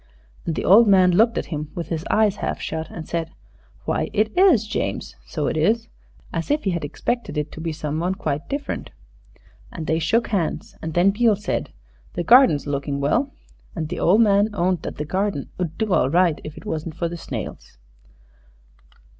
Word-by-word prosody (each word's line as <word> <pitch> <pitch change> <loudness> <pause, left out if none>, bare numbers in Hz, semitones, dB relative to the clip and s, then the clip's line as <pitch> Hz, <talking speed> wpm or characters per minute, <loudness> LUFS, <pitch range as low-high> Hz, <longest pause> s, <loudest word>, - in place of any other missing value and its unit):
And 165 - -1
the - - -3
old 220 +4 +7
man 185 -2 +6
looked 225 +6 +3
at - - -1
him 150 0 -4
with 170 - -5
his 165 -2 -2
eyes 210 -2 +3
half - - -3
shut 160 0 -4
and 160 -2 -8
said, 165 -1 -2 0.6
"Why, - - -1
it 215 +1 +1
is 355 - +5
James 210 - -3
so 150 -3 -3
it - - -1
is," 220 +9 +1 0.4
as 165 -1 -3
if 295 +1 +1
he 195 - +1
had 170 -3 -2
expected 235 - -3
it 150 0 -2
to 160 - -8
be 165 0 -2
some 155 0 -3
one 180 +3 0
quite 150 -5 -3
different. 280 +1 -4 0.8
And 160 - -6
they 160 +1 +1
shook 225 +9 +1
hands, 185 -7 -2
and 160 -1 -5
then 180 +3 +5
Beale 220 +1 +3
said, 205 - -3 0.4
"The 175 - -2
garden's 235 - +6
looking 140 0 -2
well." 240 - +1 0.4
And 160 -4 -3
the - - -4
old 200 +7 +4
man 205 -1 +4
owned 180 -2 +1
that - - -6
the 150 - -4
garden 190 -3 -2
'ud 170 -3 -3
do 215 -4 0
all 130 - +3
right 170 0 +2
if 155 - -8
it - - -11
wasn't 160 -4 -4
for 170 - -1
the 170 - -6
snails. 165 - -7
175 Hz, 195 wpm, -22 LUFS, 155-215 Hz, 0.8 s, old